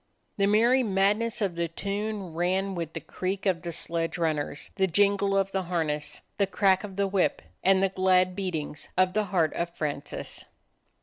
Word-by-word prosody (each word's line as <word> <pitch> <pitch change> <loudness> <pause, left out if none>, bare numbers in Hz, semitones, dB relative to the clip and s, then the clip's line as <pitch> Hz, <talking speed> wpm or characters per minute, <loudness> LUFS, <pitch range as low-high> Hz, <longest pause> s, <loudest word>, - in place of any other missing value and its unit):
The 200 -1 +3
merry 235 +5 +4
madness 210 +1 +1
of 190 -3 0
the 170 0 0
tune 200 +1 -3
ran 185 +3 0
with 165 -3 -4
the - - -4
creak 190 +2 -4
of 185 -4 +1
the 170 -1 -4
sledge 165 +1 -2
runners, 155 -3 -2
the 190 -1 +2
jingle 200 +2 +3
of 195 0 +1
the 195 - 0
harness, 160 -4 -2 0.2
the 200 - +3
crack 195 -1 +3
of 200 -2 -7
the 200 0 +1
whip, 195 -1 +1 0.2
and 190 0 +4
the 195 - +3
glad 185 -1 +3
beatings 165 -6 -4
of 185 0 +3
the 215 0 +1
heart 175 -5 +1
of 170 0 -2
Francis. 145 -2 -4
190 Hz, 180 wpm, -27 LUFS, 170-200 Hz, 0.2 s, merry